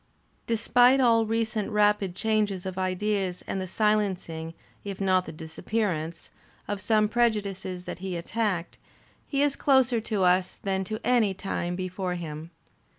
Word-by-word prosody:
Despite 245 +3 +4
all 230 -3 +4
recent 220 -1 -1
rapid 210 -3 +2
changes 210 -3 0
of 185 -1 -4
ideas 185 0 -1
and 190 - -3
the 185 - -4
silencing, 185 -6 -1 0.3
if 200 -2 -6
not 185 -2 +2
the - - -5
disappearance, 165 +1 -3 0.4
of 205 -1 -3
some 215 -1 +3
prejudices 200 -6 -1
that - - -6
he 185 -2 -4
attacked, 185 -1 -2 0.5
he 280 -1 +1
is 285 -1 +2
closer 260 -4 +3
to 210 -3 -1
us 180 0 +3
than 190 -1 -1
to 215 +3 -4
any 225 -6 +3
time 175 -2 -3
before 185 0 -3
him. 160 -2 -6
195 Hz, 145 wpm, -27 LUFS, 180-220 Hz, 0.5 s, Despite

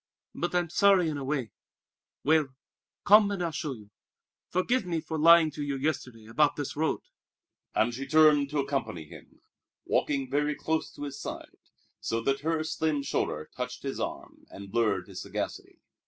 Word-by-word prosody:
"But 175 +1 -2
I'm 175 -2 +1
sorry 195 -4 +4
in 150 -2 -3
a - - -5
way! 135 -6 -2 0.7
Well, 155 0 +4 0.6
come 210 +1 +7
and 195 -3 -2
I'll 170 - -1
show 155 -2 -3
you. 105 -4 -14 0.6
Forgive 240 +8 +1
me 175 -3 -2
for 160 0 -4
lying 165 0 +7
to 150 0 -5
you 140 -1 -2
yesterday 130 -6 -3
about 145 +7 +2
this 145 -2 -4
road!" 160 +1 0 0.7
And 120 +2 +2
she 135 +3 -5
turned 150 -1 +5
to 150 - -3
accompany 135 - -2
him, - - -15 0.4
walking 140 -2 0
very 150 +3 0
close 160 +2 -1
to - - -8
his 140 -1 -6
side, - - -7 0.4
so 115 - -1
that 135 +3 0
her 160 +2 0
slim 155 -2 -1
shoulder 75 - -2
touched - - -5
his - - -4
arm - - -6
and 100 0 -10
blurred 105 -6 +1
his 95 -3 -7
sagacity. - - -5
145 Hz, 170 wpm, -28 LUFS, 130-160 Hz, 0.7 s, come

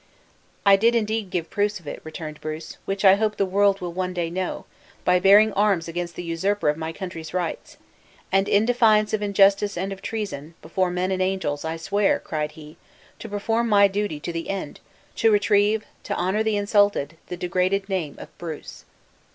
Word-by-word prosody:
"I 200 -1 +7
did 230 +4 +3
indeed 220 -2 -1
give 170 -2 -3
proofs 210 0 0
of 170 - -22
it," - - -6
returned 155 -1 -8
Bruce, 155 +1 -6
"which 195 +1 -2
I 190 - +9
hope 215 0 0
the 200 - +2
world 195 +1 +2
will 175 -1 -4
one 185 0 -3
day 170 -2 -2
know, 185 +1 -3 0.4
by 180 0 +4
bearing 205 +3 +6
arms 195 -5 +2
against 170 +1 -4
the 175 - -6
usurper 170 +2 0
of 150 - +1
my 160 +1 -4
country's 165 -2 -7
rights! 175 -3 -4 0.5
and 195 +1 +2
in 205 +2 +4
defiance 220 -3 +3
of 215 - 0
injustice 200 -1 +3
and 195 +2 -2
of 195 - -12
treason, 185 -9 -5
before 180 +3 0
men 180 +1 -1
and 185 0 -1
angels 185 -6 -1
I 160 +1 -3
swear," 200 +5 +1
cried 150 -1 -4
he, 155 -1 -13 0.4
"to 225 - -8
perform 225 +3 -1
my 200 -1 +6
duty 200 -5 -2
to 170 - -4
the 165 0 -4
end 195 -7 -4 0.4
to 225 - +4
retrieve, 205 +1 +3 0.2
to - - -2
honor 190 +4 0
the 220 -1 +1
insulted, 205 -7 +2
the 180 - -6
degraded 185 +2 0
name 180 -7 -3
of - - -12
Bruce!" 160 -3 -8
190 Hz, 190 wpm, -24 LUFS, 170-205 Hz, 0.5 s, I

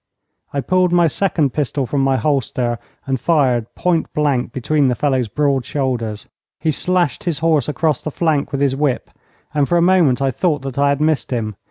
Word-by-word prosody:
I 140 - -1
pulled 180 +5 +2
my 175 -1 +4
second 160 -4 0
pistol 140 -2 -1
from 140 +3 -1
my 135 -1 +2
holster 125 -5 -1 0.3
and 135 -1 -1
fired 130 -8 +2
point 175 -3 0
blank 140 -6 0
between 140 +3 +1
the 125 - +1
fellow's 130 -3 0
broad 140 +3 0
shoulders. 120 -6 -3 0.3
He 155 +1 +1
slashed 175 -2 0
his 170 -4 +1
horse 155 -4 +1
across 155 -1 0
the - - -4
flank 155 -2 0
with 140 - -2
his 135 -2 +2
whip, 140 -2 -1 0.4
and 145 -2 +1
for 175 - +3
a - - +3
moment 175 -8 +4
I 135 -1 +1
thought 150 +1 -1
that 135 0 -4
I 140 0 +3
had 140 +1 0
missed 155 -2 +1
him. 110 -4 -3
140 Hz, 195 wpm, -18 LUFS, 130-155 Hz, 0.4 s, my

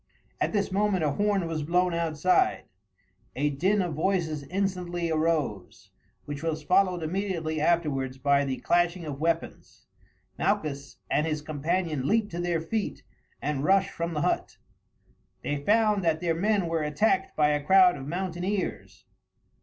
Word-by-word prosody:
At - - +1
this 200 -2 0
moment 195 -2 +1
a 150 - +2
horn 205 +2 +1
was 165 -2 -3
blown 175 +3 +1
outside. 170 +1 +1 0.7
A 145 +2 +1
din 190 +8 +1
of 175 -3 -3
voices 160 -2 0
instantly 180 -1 -2
arose, 135 - -1 0.3
which 145 -1 -6
was 160 -1 -2
followed 180 0 +2
immediately 165 -3 -2
afterwards 145 -6 0
by 140 +1 +3
the 135 -2 -2
clashing 175 0 +1
of 140 -2 -5
weapons. 165 +1 -3 0.5
Malchus 150 -9 -1
and 150 - +2
his 155 -2 -2
companion 155 -1 -1
leaped 220 -1 +1
to 170 +1 -3
their 175 -1 0
feet 210 +6 -3 0.4
and 140 -1 -1
rushed 195 +3 +3
from 170 0 -4
the 150 - 0
hut. - - -1 0.9
They 145 - -1
found 210 +5 +2
that 160 -2 +1
their 170 -2 0
men 200 +3 +1
were 165 -1 -1
attacked 150 +7 +1
by 150 -1 +4
a 150 -1 0
crowd 185 +2 +6
of 135 -1 -8
mountaineers. 185 +3 -3
165 Hz, 150 wpm, -27 LUFS, 150-185 Hz, 0.9 s, crowd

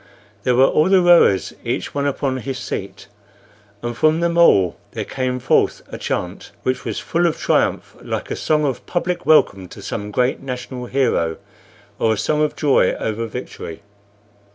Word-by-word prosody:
There 125 +3 +1
were 130 +2 +6
all 155 +5 +3
the 190 -1 +6
rowers, 170 - +5
each - - -3
one 145 0 0
upon 135 -1 -1
his 130 0 -4
seat, 95 -6 -6 0.8
and 120 0 -3
from 155 +6 +3
them 170 0 0
all 100 - +4 0.2
there - - -4
came 130 -1 -2
forth 125 +1 +1
a - - -6
chant - - -4
which 130 0 -1
was - - -4
full 170 +1 +1
of 165 - -1
triumph, - - 0
like - - -4
a - - -1
song 150 -1 +1
of 135 -4 -2
public 175 0 -2
welcome 100 -11 +4
to - - -12
some 105 0 -4
great 125 +5 0
national 125 -1 -6
hero, 120 -11 0 0.6
or 110 - +2
a - - -3
song 150 +6 0
of 150 - 0
joy 145 -3 +3
over 115 +1 -3
victory. 105 -6 -8
130 Hz, 175 wpm, -20 LUFS, 115-155 Hz, 0.8 s, were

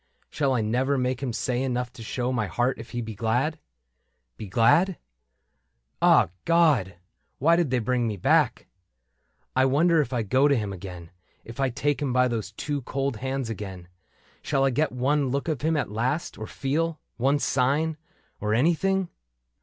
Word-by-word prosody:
Shall 140 -3 +1
I 120 - +1
never 130 +6 +1
make 125 0 -1
him 130 -3 -2
say 125 +2 -1
enough 125 -2 -2
to - - -11
show 125 +3 -2
My 110 -4 0
heart 120 +5 0
if 115 - -9
he 120 - -4
be 110 -1 -6
glad? 125 +9 0 0.8
Be 105 - -8
glad?. 115 - +4
• - - -4
• - - -9 1.1
ah! - - +5
God, 155 - +3 0.4
Why 165 +5 +4
did 170 -4 +1
they 130 - +1
bring 120 0 0
me 105 -2 -3
back? 145 -2 +2 0.9
I 130 0 +4
wonder, 160 +5 +4
if 135 - -4
I 120 -3 0
go 130 +7 +3
to 140 - +3
him 105 -5 -2
again. 90 -3 -9 0.3
If 115 +2 -10
I 135 -1 +2
take 145 +4 -1
him 135 -4 -1
by 125 0 +4
those 115 -4 -3
two 145 +4 -3
cold 135 -1 -2
hands 130 0 -3
again. 95 -5 -7 0.5
Shall 135 -2 +1
I 135 - +2
get 150 +5 +1
one 135 +2 +1
look 140 +4 -2
of 155 -6 -2
him 160 +1 +1
at 145 - -2
last, 125 +9 -1
or 110 - -7
feel 155 +4 -2 0.2
One 135 +4 +2
sign 145 +4 +1 0.2
— - - -40
or 105 0 +1
anything 175 +7 +2
130 Hz, 185 wpm, -26 LUFS, 115-145 Hz, 1.1 s, ah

